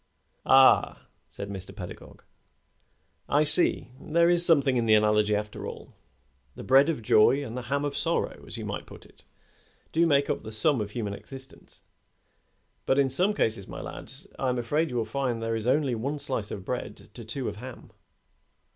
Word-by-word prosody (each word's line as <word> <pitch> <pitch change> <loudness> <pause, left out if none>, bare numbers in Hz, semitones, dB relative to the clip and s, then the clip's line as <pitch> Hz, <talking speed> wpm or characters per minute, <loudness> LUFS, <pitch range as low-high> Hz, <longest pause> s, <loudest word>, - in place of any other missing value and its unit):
"Ah!" 135 0 +5 0.2
said 100 - -7
Mr. 95 -2 -7
Pedagog. - - -10 1.1
"I 145 +1 +3
see. 155 -4 +4
There 170 +2 +2
is 175 0 +3
something 140 -6 +3
in 120 -2 0
the 110 - +6
analogy, 105 0 +2
after 105 0 -5
all. - - -10 0.6
The - - -9
bread 135 +4 +5
of 150 -8 -3
joy 130 +7 +4
and 115 - -7
the 125 - -4
ham 140 +1 0
of 145 - -3
sorrow, 165 +3 -2
as - - -7
you - - -6
might - - -5
put - - -13
it; - - -22 0.7
do 165 - +2
make 140 -2 +2
up - - -2
the 110 - -9
sum 120 +4 +2
of 105 - -4
human 105 -2 -4
existence; 135 +5 -12 1.1
but 135 - +2
in 135 -2 +2
some 185 +10 +1
cases, 110 - -1
my - - -8
lad, - - -9 0.3
I 130 - 0
am 125 - -1
afraid 150 +7 0
you 125 - -6
will 115 -2 0
find 130 -3 -2
there 115 0 -2
is 110 +1 -4
only 140 0 +2
one 135 +6 -3
slice 130 -7 -4
of 95 - -7
bread 110 -4 -6
to 120 - -10
two 120 +4 -5
of 105 - -5
ham." 125 +2 -11
130 Hz, 190 wpm, -27 LUFS, 110-145 Hz, 1.1 s, the